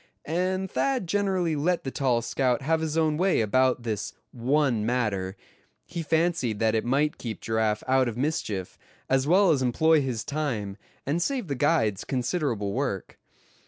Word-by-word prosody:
And 185 Hz, +3 st, -1 dB
Thad 265 Hz, -7 st, 0 dB
generally 185 Hz, -3 st, 0 dB
let 170 Hz, +4 st, 0 dB
the 135 Hz, -, -4 dB
tall 125 Hz, -5 st, +1 dB
scout 130 Hz, -1 st, 0 dB
have 160 Hz, +3 st, +1 dB
his 160 Hz, 0 st, -2 dB
own 155 Hz, -2 st, +2 dB
way 185 Hz, +2 st, +2 dB
about 125 Hz, +3 st, +2 dB
this 110 Hz, -3 st, -3 dB, 0.2 s
one 125 Hz, -2 st, +1 dB
matter; 105 Hz, -5 st, -1 dB, 0.5 s
he 170 Hz, +2 st, -5 dB
fancied 160 Hz, -8 st, +1 dB
that 110 Hz, 0 st, +2 dB
it 110 Hz, -, +1 dB
might 140 Hz, +5 st, +1 dB
keep 115 Hz, -3 st, -5 dB
Giraffe 110 Hz, -1 st, 0 dB
out 130 Hz, -1 st, +3 dB
of 120 Hz, -1 st, -4 dB
mischief; 125 Hz, -, -2 dB, 0.3 s
as 135 Hz, +1 st, +2 dB
well 185 Hz, +2 st, +5 dB
as 140 Hz, -4 st, +2 dB
employ 155 Hz, +5 st, +3 dB
his 125 Hz, -5 st, -2 dB
time, 130 Hz, -10 st, -3 dB, 0.3 s
and 155 Hz, +5 st, 0 dB
save 245 Hz, -, -1 dB
the -, -, 0 dB
guides 130 Hz, -, +1 dB
considerable 125 Hz, -, -1 dB
work. -, -, -3 dB
135 Hz, 160 wpm, -26 LUFS, 115-160 Hz, 0.5 s, well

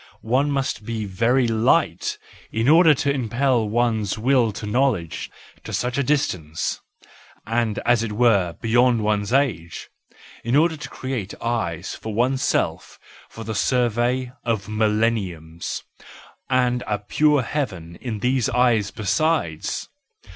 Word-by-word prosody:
One 130 Hz, +6 st, +2 dB
must 135 Hz, -5 st, -1 dB
be 110 Hz, -1 st, -3 dB
very 115 Hz, +6 st, +2 dB
light 110 Hz, 0 st, +1 dB, 0.3 s
in 115 Hz, +2 st, 0 dB
order 160 Hz, 0 st, +7 dB
to 140 Hz, -1 st, 0 dB
impel 125 Hz, -2 st, +1 dB
one's 110 Hz, -3 st, 0 dB
will 120 Hz, 0 st, +2 dB
to 105 Hz, -, -6 dB
knowledge 105 Hz, -7 st, 0 dB, 0.3 s
to -, -, -8 dB
such 125 Hz, 0 st, -1 dB
a -, -, +2 dB
distance, 90 Hz, -, -1 dB, 0.6 s
and 115 Hz, -1 st, 0 dB
as 120 Hz, -1 st, +4 dB
it 115 Hz, -2 st, -3 dB
were 105 Hz, -6 st, +3 dB
beyond 120 Hz, 0 st, +3 dB
one's 105 Hz, 0 st, 0 dB
age, 120 Hz, -, -1 dB, 0.5 s
in 120 Hz, +3 st, 0 dB
order 160 Hz, +2 st, +4 dB
to 150 Hz, -, -8 dB
create 125 Hz, -7 st, -5 dB
eyes 95 Hz, -8 st, -2 dB
for 110 Hz, -2 st, -6 dB
oneself 130 Hz, +3 st, 0 dB, 0.3 s
for 115 Hz, -, -9 dB
the 110 Hz, 0 st, -4 dB
survey 125 Hz, +2 st, +1 dB
of 110 Hz, -5 st, -1 dB
millenniums, 105 Hz, -7 st, -1 dB, 0.7 s
and 125 Hz, -1 st, +2 dB
a 105 Hz, -, 0 dB
pure 145 Hz, +7 st, +2 dB
heaven 95 Hz, -, -4 dB
in 110 Hz, -5 st, -4 dB
these 125 Hz, -1 st, +1 dB
eyes 120 Hz, -4 st, +2 dB
besides! 110 Hz, -, -1 dB
115 Hz, 130 wpm, -22 LUFS, 105-130 Hz, 0.7 s, order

